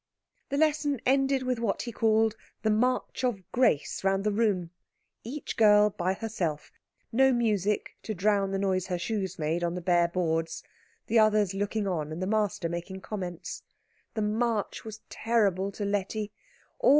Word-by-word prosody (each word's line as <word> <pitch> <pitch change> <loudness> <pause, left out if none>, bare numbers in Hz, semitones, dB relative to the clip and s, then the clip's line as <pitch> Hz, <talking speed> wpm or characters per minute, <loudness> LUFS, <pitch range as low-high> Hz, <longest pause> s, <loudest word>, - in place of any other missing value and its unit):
The 280 - -1
lesson 295 -3 +2
ended 270 0 +3
with 255 -2 -1
what 225 -4 -1
he 240 - -5
called 220 0 +2 0.3
the 220 - +3
March 250 +4 0
of 230 -7 0
Grace 245 - +1
round 195 0 +2
the 210 - +1
room, 200 -6 +1 0.5
each 275 +6 -5
girl 210 -1 +6
by 185 0 -1
herself, 180 -9 -3 0.4
no 265 +3 +5
music 210 -4 0
to 215 - -4
drown 200 +1 +2
the 195 - -1
noise 190 -1 0
her 180 -2 -1
shoes 190 -1 -3
made 160 +2 -1
on 170 0 -1
the - - -2
bare 175 -1 +3
boards, 165 -2 -1 0.4
the 230 - +3
others 215 -3 +4
looking 205 +2 -1
on, 155 -5 -2
and 160 - -5
the 185 - -1
master 205 -4 0
making 175 +3 -5
comments. 180 -6 -5 0.5
This 215 - 0
march 220 0 -1
was 220 -1 -8
terrible 200 -4 +1
to 205 - -3
Letty. 205 +1 -2
205 Hz, 160 wpm, -28 LUFS, 185-225 Hz, 0.5 s, girl